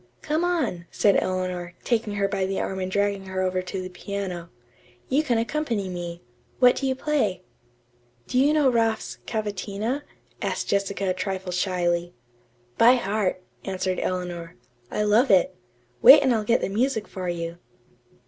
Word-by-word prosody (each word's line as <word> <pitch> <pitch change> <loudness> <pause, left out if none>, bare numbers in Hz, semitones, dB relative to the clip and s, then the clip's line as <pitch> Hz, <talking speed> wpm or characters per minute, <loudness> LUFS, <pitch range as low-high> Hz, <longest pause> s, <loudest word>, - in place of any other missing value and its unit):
"Come 310 +3 0
on," 270 - -1
said 200 -2 +3
Eleanor, 180 -2 -3
taking 225 -3 0
her 200 -1 +1
by 195 -1 -1
the 195 - -2
arm 190 - -3
and 185 0 -3
dragging 200 0 0
her 190 0 -2
over 185 0 0
to 185 +1 -5
the - - -5
piano. 180 -2 -5 0.6
"You 280 +4 +3
can 250 -7 0
accompany 230 -5 -1
me. 175 -1 -6 0.3
What 250 -1 +6
do 270 - -1
you 260 - 0
play?" 255 -11 0 0.8
"Do 250 - 0
you 280 +3 +4
know 305 -3 +3
Raff's 225 -3 0
'Cavatina'?" 215 +4 -2 0.4
asked - - -2
Jessica 200 -1 0
a - - +1
trifle 185 0 -3
shyly. 175 -1 0 0.6
"By 240 +3 +7
heart," 200 -5 -1 0.2
answered 185 -1 -2
Eleanor. 175 -2 -3 0.3
"I 210 - -1
love 215 +6 +4
it. 190 -3 +4 0.5
Wait 280 - +10
and 260 -2 +3
I'll 220 -2 0
get 235 +2 +3
the - - -1
music 220 +1 0
for 185 -2 -5
you." 170 0 -4
200 Hz, 160 wpm, -25 LUFS, 185-230 Hz, 0.8 s, Wait